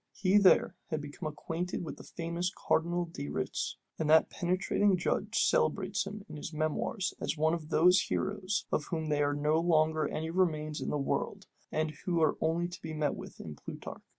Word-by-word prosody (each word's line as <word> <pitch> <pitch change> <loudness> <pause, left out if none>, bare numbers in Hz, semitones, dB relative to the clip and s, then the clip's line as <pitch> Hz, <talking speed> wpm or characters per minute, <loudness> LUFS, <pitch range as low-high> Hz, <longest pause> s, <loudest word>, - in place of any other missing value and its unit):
He 195 +2 +4
there 195 -2 +5 0.2
became 155 +1 -4
acquainted 165 +4 -4
with - - -6
the - - -11
famous 170 +1 -3 0.2
Cardinal 175 +2 +2
de 120 - -6
Retz, 75 - -2 0.2
and 155 -2 0
that 160 +1 +6
penetrating 185 +2 +2
judge 180 - 0
celebrates 480 - +1
him 205 0 -7
in - - -8
his 150 - -6
memoirs 155 +5 -1
as - - -1
one 160 +2 +3
of 160 -2 -4
those 180 +4 +5
heroes, 200 0 -1
of 150 - 0
whom 160 -2 -3
there 145 -1 +2
are 145 - -1
no 150 +2 +2
longer 155 -2 +3
any 160 +1 -3
remains 155 -4 0
in - - -2
the - - 0
world, 135 - -2 0.3
and 155 0 0
who 175 -2 +1
are 155 -2 +3
only 165 +2 +1
to 175 0 -9
be 160 -1 -5
met 150 -1 +1
with - - -9
in 75 -2 -7
Plutarch. - - -8
160 Hz, 190 wpm, -31 LUFS, 155-180 Hz, 0.3 s, that